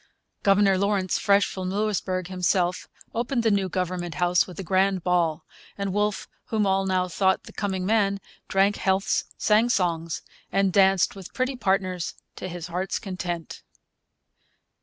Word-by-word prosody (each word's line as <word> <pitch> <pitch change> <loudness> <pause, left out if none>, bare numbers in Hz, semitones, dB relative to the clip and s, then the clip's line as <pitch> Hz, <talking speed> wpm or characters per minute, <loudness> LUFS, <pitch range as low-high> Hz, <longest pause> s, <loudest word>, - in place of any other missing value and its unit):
Governor 195 -1 +4
Lawrence, 200 -2 +1
fresh 200 -1 +4
from 185 -1 -4
Louisbourg 190 -2 -1
himself, 180 -1 0 0.3
opened 235 +1 -1
the 225 - +3
new 195 -2 +1
Government 180 -2 -3
House 175 +2 +2
with 180 -1 -10
a - - -3
grand 190 0 +1
ball; 170 -3 +1 0.3
and 200 -2 -2
Wolfe, 210 0 0 0.2
whom 215 -2 0
all 195 0 +1
now 185 -1 +1
thought 190 +1 +1
the - - -13
coming 190 -3 -2
man, 200 -1 +2 0.3
drank 195 +2 +2
healths, 190 0 +1
sang 220 +3 +3
songs, 170 -6 0 0.3
and 195 -2 +2
danced 195 -1 +4
with 195 -2 -11
pretty 260 +1 0
partners 190 -5 -1 0.2
to - - -5
his 175 -2 -6
heart's 180 +2 -2
content. 180 -4 -5
190 Hz, 150 wpm, -25 LUFS, 180-200 Hz, 0.3 s, Governor